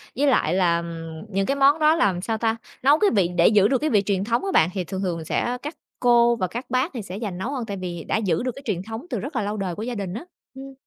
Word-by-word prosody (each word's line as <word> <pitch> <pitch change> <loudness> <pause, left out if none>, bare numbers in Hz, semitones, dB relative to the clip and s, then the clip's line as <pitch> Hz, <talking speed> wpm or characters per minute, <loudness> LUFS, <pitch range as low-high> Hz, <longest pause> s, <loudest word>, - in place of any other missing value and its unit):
với 285 +3 +2
lại 180 - +2
là, 175 -3 +3
ừm, 165 0 -7
những 195 -1 0
cái 275 - 0
món 280 +3 +4
đó, 310 +1 +5
làm 190 - +1
sao 220 +2 -2
ta, 225 0 0 0.3
nấu 290 +3 +5
cái 415 - +4
vị 185 -4 +3
để 170 - +6
giữ 205 -2 +5
được 265 - +2
cái 305 +3 -1
vị 210 -3 +4
truyền 195 -2 0
thống 235 - 0
á 390 - -1
bạn, 160 - +4
thì 185 -2 -2
thường 190 +2 -5
thường 170 -4 -3
sẽ 245 +9 -1
các 295 +3 -6 0.2
cô 240 -1 +4
và 185 -5 -1
các 240 +7 -6
bác 255 +7 0
thì 235 - -4
sẽ 195 0 -7
giành 195 -5 -4
nấu 230 +8 -3
hơn 255 -5 -3
tại 200 -2 -5
vì 175 -3 -5
đã - - 0
giữ 195 -1 0
được 255 - -1
cái 275 - -9
truyền 190 -5 -2
thống 225 - -7
từ 240 - -2
rất 275 - -6
là 230 - +1
lâu 205 +1 -3
đời 190 -4 -3
của 215 - -5
gia 245 0 -4
đình 195 -3 -4
á, 230 - -6 0.3
ừm. 270 0 -9
215 Hz, 305 wpm, -23 LUFS, 185-255 Hz, 0.3 s, để